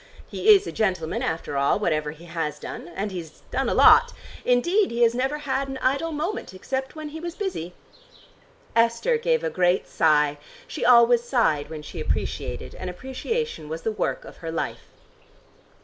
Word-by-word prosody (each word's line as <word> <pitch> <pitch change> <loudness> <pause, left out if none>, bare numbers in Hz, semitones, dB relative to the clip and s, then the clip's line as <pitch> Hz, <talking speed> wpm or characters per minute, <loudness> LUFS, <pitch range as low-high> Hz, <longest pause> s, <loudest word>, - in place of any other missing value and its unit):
He 435 - -1
is 400 0 +1
a - - -4
gentleman 185 -6 -1
after 160 -3 -2
all, 140 0 +3
whatever 155 -7 0
he 160 +3 -10
has 160 -3 -3
done. 150 - -8
And 200 +1 -3
he's 165 -4 -8
done 265 +2 0
a - - 0
lot. 480 0 +7 0.3
Indeed 345 - +3
he 235 +1 +1
has 230 0 +4
never 265 +4 -1
had 275 -2 -2
an 270 -1 -5
idle 275 +6 0
moment, 310 - -4
except 265 +8 -4
when 310 -1 -6
he 315 +2 -7
was 340 +1 -6
busy!" 180 - -4 1.0
Esther 230 - +2
gave 480 0 +1
a - - -1
great 180 0 +2
sigh: 150 -2 +2 0.3
she - - -5
always 240 -1 +6
sighed 225 - +1
when 155 -1 -7
she - - -8
appreciated, - - -3
and 185 - -6
appreciation 265 - -4
was 160 +1 -5
the 225 - 0
work 215 - -2
of - - -12
her 165 -1 -6
life. 165 - -4
235 Hz, 180 wpm, -24 LUFS, -, 1.0 s, lot